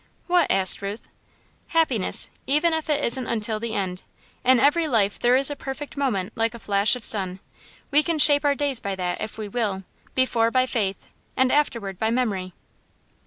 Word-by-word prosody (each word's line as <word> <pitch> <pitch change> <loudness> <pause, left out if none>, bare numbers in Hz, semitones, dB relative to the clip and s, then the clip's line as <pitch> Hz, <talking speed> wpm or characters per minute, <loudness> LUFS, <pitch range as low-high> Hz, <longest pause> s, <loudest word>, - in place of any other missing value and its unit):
"What?" 355 -1 +2
asked 190 -1 +5
Ruth. 200 +2 -6 0.6
"Happiness 275 - 0 0.2
even 300 +4 +2
if 320 0 -3
it 295 -1 +1
isn't 245 +1 -1
until 220 -1 0
the 230 0 -4
end. 185 -2 -3 0.4
In 255 -1 +4
every 315 +5 +3
life 210 -7 +1
there 245 +1 +3
is 270 +2 +3
a - - -3
perfect 275 +1 -7
moment, 220 -9 -2
like 225 0 -1
a - - -9
flash 205 +2 +2
of 250 - -9
sun. 190 -4 0 0.5
We 295 +1 +5
can 330 +1 -1
shape 290 -1 +6
our 285 -1 +2
days 280 -4 0
by 200 -1 -4
that, 180 -1 -4
if 215 - -5
we 215 -1 -5
will 200 -3 -2 0.3
before 240 -3 +2
by 255 +1 +2
faith, 205 -7 -3 0.3
and 260 0 +3
afterward 235 -10 -1
by 220 - 0
memory." 205 -7 -2
235 Hz, 185 wpm, -23 LUFS, 200-280 Hz, 0.6 s, shape